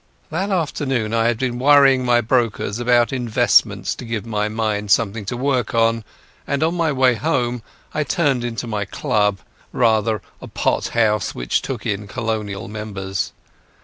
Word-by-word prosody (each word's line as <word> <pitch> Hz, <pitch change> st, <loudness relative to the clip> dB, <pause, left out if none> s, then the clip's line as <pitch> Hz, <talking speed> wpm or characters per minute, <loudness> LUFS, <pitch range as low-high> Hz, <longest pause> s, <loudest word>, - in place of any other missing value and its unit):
That 190 Hz, +5 st, -1 dB
afternoon 135 Hz, -, -1 dB
I 115 Hz, 0 st, +2 dB
had 120 Hz, -1 st, +1 dB
been 125 Hz, 0 st, -2 dB
worrying 135 Hz, -1 st, +5 dB
my 120 Hz, -1 st, +3 dB
brokers 115 Hz, -3 st, 0 dB
about 120 Hz, +1 st, +3 dB
investments 120 Hz, -4 st, +2 dB
to -, -, -9 dB
give 115 Hz, -3 st, -4 dB
my 105 Hz, -2 st, -1 dB
mind 105 Hz, -2 st, -2 dB
something 105 Hz, +1 st, +1 dB
to 120 Hz, +5 st, -4 dB
work 130 Hz, -2 st, 0 dB
on, 115 Hz, 0 st, +2 dB, 0.4 s
and 140 Hz, +2 st, 0 dB
on 165 Hz, +2 st, +1 dB
my 165 Hz, -3 st, +1 dB
way 130 Hz, -2 st, +3 dB
home 125 Hz, -2 st, -1 dB, 0.3 s
I 150 Hz, -, 0 dB
turned 145 Hz, -7 st, +1 dB
into 120 Hz, -1 st, -3 dB
my 105 Hz, -3 st, -2 dB
club—rather 105 Hz, +2 st, 0 dB, 0.2 s
a -, -, -8 dB
pot -, -, 0 dB
house, 105 Hz, -3 st, +2 dB
which -, -, 0 dB
took -, -, -5 dB
in 105 Hz, 0 st, -2 dB
Colonial 110 Hz, -3 st, -3 dB
members. 100 Hz, -4 st, -4 dB
115 Hz, 155 wpm, -20 LUFS, 105-130 Hz, 0.4 s, worrying